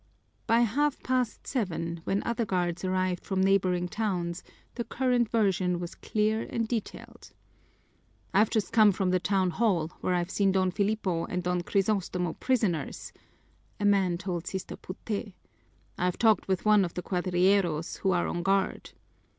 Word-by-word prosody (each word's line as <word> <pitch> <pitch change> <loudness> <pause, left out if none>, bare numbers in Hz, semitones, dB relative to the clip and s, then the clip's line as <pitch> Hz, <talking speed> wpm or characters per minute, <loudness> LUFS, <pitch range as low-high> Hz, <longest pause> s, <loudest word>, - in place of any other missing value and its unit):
By 230 +1 +4
half 275 +6 +1
past 255 -3 -1
seven, 170 - -3
when 195 +1 0
other 235 0 -1
guards 180 -3 -1
arrived 185 -1 0
from 190 -2 -2
neighboring 185 -2 +2
towns, 180 -4 -2 0.3
the 235 - -3
current 245 -2 +1
version 190 -5 +1
was 175 0 -5
clear 215 +1 0
and 230 -1 -1
detailed. 225 -3 -6 1.0
"I've 210 +2 +4
just 220 0 -1
come 215 -3 +6
from 185 0 0
the 185 - +2
town 190 -1 +1
hall, 175 -5 +1
where 180 - +1
I've 175 +1 -1
seen 195 -2 +2
Don 185 -1 +2
Filipo 200 -4 0
and 180 0 -3
Don 180 0 0
Crisostomo 185 -3 0
prisoners," 215 - -1 0.7
a 205 - -1
man 195 -4 +3
told 180 -1 -4
Sister 190 -1 -5
Puté. 200 +1 -6 0.7
"I've 180 0 0
talked 220 -5 +3
with 190 0 -1
one 210 -2 +5
of 170 - -4
the 180 - -4
cuadrilleros 180 -2 +1
who 195 - 0
are 175 -2 +2
on 175 - -2
guard. 195 +2 0
190 Hz, 155 wpm, -28 LUFS, 180-215 Hz, 1.0 s, come